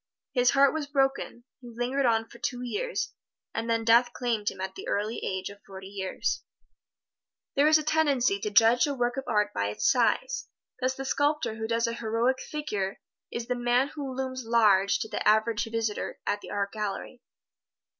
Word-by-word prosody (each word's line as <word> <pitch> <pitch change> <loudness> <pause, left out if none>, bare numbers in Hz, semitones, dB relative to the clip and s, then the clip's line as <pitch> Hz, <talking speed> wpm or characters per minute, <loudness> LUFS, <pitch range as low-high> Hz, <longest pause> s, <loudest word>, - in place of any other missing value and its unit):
His 250 -2 +4
heart 275 +1 +5
was 310 -2 -3
broken; 270 -3 0 0.2
he 245 -2 -11
lingered 245 +3 0
on 225 -1 +2
for 235 - -15
two 245 0 -3
years, 480 - -2 0.4
and 225 +1 -3
then 230 0 +1
death 240 +2 +5
claimed 230 -4 -1
him - - -11
at 190 0 -4
the 390 - -9
early 210 +3 -1
age 190 0 -2
of 200 0 -15
forty 190 -1 -10
years. 195 -2 -2 1.1
There 285 +2 +5
is 310 0 +7
a 310 - -3
tendency 280 -9 +2
to 210 - -2
judge 230 +5 +5
a 285 - -2
work 245 -1 0
of 270 - -3
art 210 -3 +1
by 100 - 0
its 105 +1 -1
size. 260 - +1 0.3
Thus 260 0 0
the 270 - -5
sculptor 290 -2 +1
who 220 0 -4
does 230 +1 +1
a 230 - -1
"heroic 230 +3 0
figure" 210 -11 -3 0.3
is 235 - -4
the 250 - -1
man 245 +2 +2
who 275 -4 -6
looms 260 -1 -3
large 210 -4 +4
to - - -3
the - - -4
average 220 +1 +3
visitor 225 -2 -2
at 205 0 -1
the - - -10
art 200 -1 -2
gallery. 215 +3 -5
235 Hz, 190 wpm, -28 LUFS, 215-265 Hz, 1.1 s, is